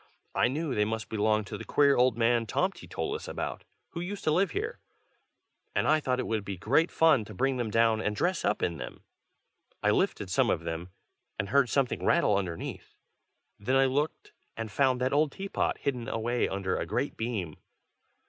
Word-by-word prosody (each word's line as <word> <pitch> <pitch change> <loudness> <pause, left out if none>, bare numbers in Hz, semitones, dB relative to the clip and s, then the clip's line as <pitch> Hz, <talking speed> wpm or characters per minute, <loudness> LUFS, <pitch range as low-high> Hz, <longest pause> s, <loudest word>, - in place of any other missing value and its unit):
I - - +3
knew 145 +2 -2
they 105 - +2
must 110 -1 -3
belong 110 0 +1
to 105 +1 -7
the - - -6
queer 140 -1 +4
old 125 -2 +3
man 115 0 +2
Tomty 190 - -1
told 410 - -3
us 450 - -6
about, - - -4 0.2
who 170 - -6
used 195 +3 -5
to 155 - +2
live 185 +5 +3
here, 435 +5 -3 1.0
and - - +2
I 155 +1 +4
thought 130 -4 -1
it - - -1
would 110 -2 -1
be 100 -1 -5
great 140 - +2
fun 160 -8 +4
to - - -10
bring 135 0 +1
them 120 -3 -1
down 115 0 +3
and 105 -1 -1
dress 175 - 0
up - - 0
in 85 - 0
them. - - -8 0.8
I - - +4
lifted - - 0
some - - +3
of - - +1
them, 80 +2 -4 0.5
and 100 - -2
heard 140 -1 +4
something 135 -1 0
rattle 105 - +3
underneath: 90 -4 -4 0.6
then 125 +6 0
I 135 0 +5
looked, 145 +4 -1 0.3
and 115 -2 -4
found 130 +2 +2
that 130 +2 +1
old 150 0 +3
teapot, 195 +5 -2
hidden 125 -4 -2
away 120 +2 0
under 95 -1 -1
a - - -3
great - - -1
beam. 105 -9 -3
125 Hz, 195 wpm, -29 LUFS, 105-145 Hz, 1.0 s, I